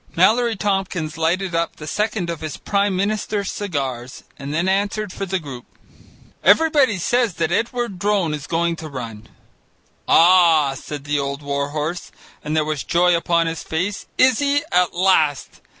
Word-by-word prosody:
Mallory 225 +6 +3
Tompkins 195 -6 -2
lighted 175 +3 -1
up 165 0 -1
the 150 - -10
second 210 0 -2
of 165 - -7
his 155 -2 -5
Prime 200 -1 0
Minister's 205 0 -1
cigars 135 -10 -4 0.2
and 140 0 -6
then 165 +4 0
answered 200 +1 -1
for 195 - -5
the 190 +1 0
group: 140 -8 -8 0.8
"Everybody 290 - +4
says 235 +2 0
that 165 0 -1
Edward 230 -1 -2
Drone 200 -5 +1
is 145 -1 -6
going 170 0 0
to 160 -1 -8
run." 115 -5 -8 0.8
"Ah!" 165 -5 +5
said 145 +1 -7
the 145 0 -1
old 140 +1 -4
war 140 0 -2
horse, 155 +4 -4 0.3
and 150 +1 -3
there 155 - +2
was 155 -2 -3
joy 175 0 +3
upon 170 0 +1
his 165 -1 -3
face, 185 +6 -3
"is 255 -2 +4
he? 285 0 +1
At 180 -1 +2
last! 175 -6 +1
170 Hz, 165 wpm, -20 LUFS, 150-200 Hz, 0.8 s, Ah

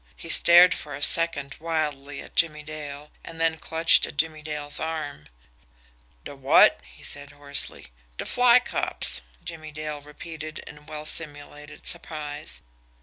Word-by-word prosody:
He - - -9
stared 175 0 +7
for 145 -2 -7
a 145 - -2
second 145 -5 +1
wildly 150 -4 -3
at - - -15
Jimmie 150 -2 +1
Dale, 150 -1 -8
and 165 -1 -10
then 165 -1 +1
clutched 165 +2 +4
at - - -11
Jimmie 155 0 -1
Dale's 150 -1 0
arm. 155 - -5 1.0
"De - - -8
WOT?" 135 0 +5
he - - -17
said 145 0 -5
hoarsely. 145 0 -2 0.3
"De - - -4
fly 245 -1 +5
cops," 250 - -1 0.2
Jimmie 155 -1 -8
Dale 150 -1 -5
repeated 155 +1 -9
in 150 +1 -13
well 155 0 -7
simulated 150 -1 -2
surprise. 150 -3 -5
150 Hz, 145 wpm, -25 LUFS, 145-160 Hz, 1.0 s, stared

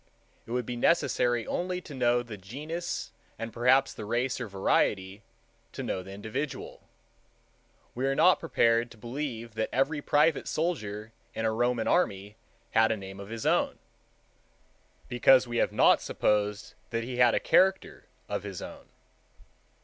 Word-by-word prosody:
It - - -9
would 125 -1 -1
be 125 - -4
necessary 120 -4 +2
only 180 +1 -2
to 155 - -11
know 120 -2 +2
the 115 -3 -8
genus 150 - -5 0.3
and 115 0 -6
perhaps 125 +3 +3
the - - -8
race 120 +4 -1
or 120 - -3
variety, 95 0 0 0.5
to - - -5
know 95 - -2
the 95 - -12
individual. 110 +9 -6 1.0
We 130 +2 -1
are 135 - +1
not 180 +5 +5
prepared 115 -7 +2
to 115 - -15
believe 120 -1 -5
that 110 0 -2
every 140 +4 0
private 150 +2 +2
soldier 110 -10 -3 0.2
in 110 - -2
a 110 - +2
Roman 120 0 0
army 105 - 0 0.4
had 110 0 +4
a 110 - 0
name 95 0 -9
of 100 0 -9
his 115 0 -6
own—because 120 - -1
we 120 0 -3
have - - +2
not - - +5
supposed 105 0 -1 0.2
that 115 0 -2
he 125 +1 -5
had 125 -2 +5
a - - +2
character 190 +1 +2 0.2
of - - -3
his - - -7
own. - - -10
120 Hz, 155 wpm, -28 LUFS, 105-135 Hz, 1.0 s, not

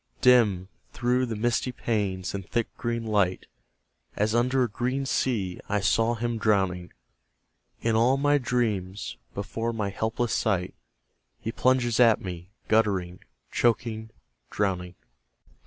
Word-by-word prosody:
Dim, 110 -8 +4 0.3
through 125 +1 +1
the 115 - -3
misty 120 +3 0
panes 100 -6 -2
and 100 -1 -4
thick 120 -1 -1
green 115 -1 -3
light, 100 -4 +1 0.7
As 105 +1 +1
under 125 +2 +2
a - - +1
green 130 +5 -2
sea, 105 -9 -1
I 105 +1 +1
saw 115 +5 +2
him 120 0 -2
drowning. 95 -5 +1 0.9
In 115 -1 +2
all 120 +4 +4
my 145 +1 +3
dreams, 110 -6 -2 0.2
before 115 +3 -3
my 105 -3 -2
helpless 110 +3 -1
sight, 95 -5 0 0.7
He 115 - -4
plunges 125 -2 +2
at 115 -3 +6
me, 90 -1 -7 0.2
guttering, 95 -5 +1 0.3
choking, 115 -2 0 0.4
drowning. 90 -3 -2
110 Hz, 125 wpm, -27 LUFS, 95-120 Hz, 0.9 s, at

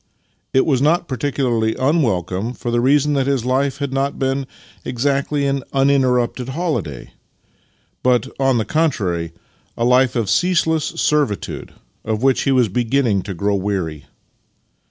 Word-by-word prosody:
It 130 - +3
was 135 -4 +1
not 170 +4 +2
particu 135 +1 -2
larly 110 -2 +1
unwelcom.e, 115 - 0
for 120 -1 -5
the 120 0 +1
reason 145 +3 +3
that 135 -2 +1
his 135 -4 0
life 135 +2 0
had 140 -2 -3
not 135 +1 -1
been 135 0 -1 0.4
exactly 140 +3 -1
an 140 0 0
uninterrupted 130 -2 +2
holiday, 145 - -3 0.9
but, 125 +1 +2
on 135 -2 +3
the 110 - 0
contrary, 100 - 0 0.5
a 115 - 0
life 125 0 +3
of 115 -4 0
ceaseless 160 - +2
servitude, 145 -9 -1 0.3
of 110 +1 -2
which 135 -1 +2
he 135 - +2
was 125 -3 +3
beginning 120 -1 +1
to 95 0 -6
groNV 100 +2 0
weary. 90 -7 -3
130 Hz, 145 wpm, -19 LUFS, 110-140 Hz, 0.9 s, It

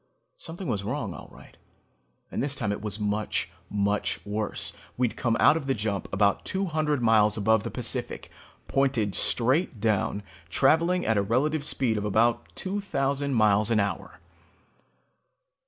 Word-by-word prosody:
Something 170 +2 -7
was 100 -1 -1
wrong 110 -3 -3
all - - -11
right, - - -16 0.8
and - - -2
this 140 0 -1
time 110 -7 -2
it 100 - -3
was 105 -1 -3
much, 105 -3 -1 0.2
much 100 0 0
worse. 105 0 -1 0.2
We'd 125 -2 0
come 115 -2 0
out - - +6
of 155 -4 -3
the 135 - +1
jump 105 -2 -3
about 100 0 +2
two 195 +1 -1
hundred 155 -5 0
miles 110 -2 +4
above 110 +1 +3
the - - -5
Pacific, - - -4 0.4
pointed 130 -7 +1
straight 130 - +1
down, 110 -1 0 0.3
traveling 165 - +3
at 110 -1 +2
a - - +3
relative 140 +9 +1
speed 120 -7 0
of 105 - -4
about 115 +3 +2
two 200 +2 -3
thousand 140 -6 -1
miles 105 -1 +3
an 115 -2 +3
hour. 100 0 -3
115 Hz, 155 wpm, -27 LUFS, 105-140 Hz, 0.8 s, out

